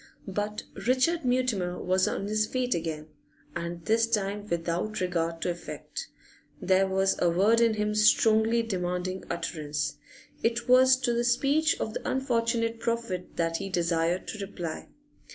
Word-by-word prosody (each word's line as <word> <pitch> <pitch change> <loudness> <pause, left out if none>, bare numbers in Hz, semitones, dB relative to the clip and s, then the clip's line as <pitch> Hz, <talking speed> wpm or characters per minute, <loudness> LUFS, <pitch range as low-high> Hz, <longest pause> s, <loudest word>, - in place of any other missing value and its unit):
But 205 +2 -3 0.2
Richard 285 +7 +2
Mutimer 245 -8 0
was 185 0 +2
on 195 - -2
his 215 +1 0
feet 250 0 0
again, 160 -2 -4 0.5
and 170 0 -5
this 225 +1 +3
time 205 -2 -1
without 170 +4 -2
regard 170 -2 -1
to 180 - 0
effect; 325 - -7 0.5
there 190 0 +3
was 190 0 +1
a 175 - +4
word 205 +7 +3
in 230 -2 +3
him 210 0 0
strongly 220 +2 +4
demanding 185 -2 -3
utterance. 150 -3 -3 0.4
It 235 +1 0
was 255 +1 +6
to 245 -2 +1
the 235 0 +1
speech 280 +6 +2
of 220 - -3
the - - -4
unfortunate 230 -3 0
prophet 230 -7 -3
that 165 -1 0
he 195 +2 -5
desired 170 0 0
to 215 - -6
reply. 175 -5 -6
205 Hz, 150 wpm, -28 LUFS, 175-230 Hz, 0.5 s, was